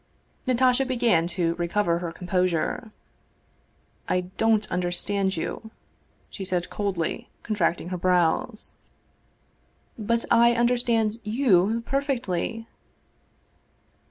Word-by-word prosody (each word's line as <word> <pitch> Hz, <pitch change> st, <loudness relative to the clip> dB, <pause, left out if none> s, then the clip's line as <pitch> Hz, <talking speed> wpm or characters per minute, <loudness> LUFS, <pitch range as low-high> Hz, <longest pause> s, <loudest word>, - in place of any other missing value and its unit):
Natasha 255 Hz, +1 st, +3 dB
began 235 Hz, -10 st, +2 dB
to 175 Hz, -1 st, 0 dB
recover 170 Hz, 0 st, +1 dB
her 175 Hz, -1 st, -4 dB
composure. 180 Hz, +4 st, -1 dB, 0.6 s
" -, -, -23 dB
I -, -, +1 dB, 0.2 s
don't 220 Hz, -2 st, +3 dB
understand 185 Hz, +2 st, 0 dB
you," 220 Hz, +6 st, -4 dB, 0.6 s
she 195 Hz, -, -6 dB
said 180 Hz, -1 st, -2 dB
coldly, 195 Hz, -6 st, -2 dB
contracting 180 Hz, -5 st, 0 dB
her 180 Hz, -1 st, -4 dB
brows. 180 Hz, +5 st, +1 dB, 0.6 s
" -, -, -30 dB
But 235 Hz, 0 st, +2 dB
I 235 Hz, 0 st, +6 dB
understand 235 Hz, -2 st, +2 dB
you 215 Hz, -2 st, +2 dB
perfectly." 235 Hz, -6 st, -2 dB
205 Hz, 100 wpm, -25 LUFS, 180-235 Hz, 0.6 s, I